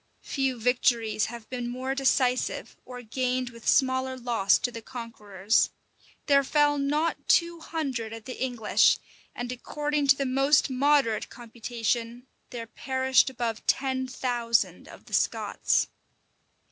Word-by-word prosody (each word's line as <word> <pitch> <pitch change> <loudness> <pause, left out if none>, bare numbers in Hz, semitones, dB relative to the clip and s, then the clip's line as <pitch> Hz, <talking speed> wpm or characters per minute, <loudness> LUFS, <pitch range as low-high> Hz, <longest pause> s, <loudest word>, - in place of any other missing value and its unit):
Few 265 -3 -1
victories 230 -2 +1
have 235 -1 -9
been 245 -1 -3
more 255 +2 -3
decisive, 260 -2 0
or 250 -1 -9
gained 255 +1 -2
with 230 -1 -12
smaller 260 0 +2
loss 235 -5 +2
to 245 - -2
the 230 - -8
conquerors. 215 -4 -1 0.6
There 280 -1 +4
fell 290 +1 +2
not 295 +4 -1
two 340 0 +3
hundred 270 -9 -4
of 225 -1 -8
the 255 0 -5
English; 240 -4 +3 0.4
and 245 0 -4
according 295 +3 -2
to 275 - +7
the 275 - -2
most 270 +2 +3
moderate 270 -4 +2
computation, 235 0 -4 0.2
there 235 -2 -6
perished 260 +2 +1
above 235 -4 -3
ten 260 -1 +1
thousand 240 -3 -1
of - - -14
the - - -14
Scots. - - +1
255 Hz, 135 wpm, -27 LUFS, 235-270 Hz, 0.6 s, to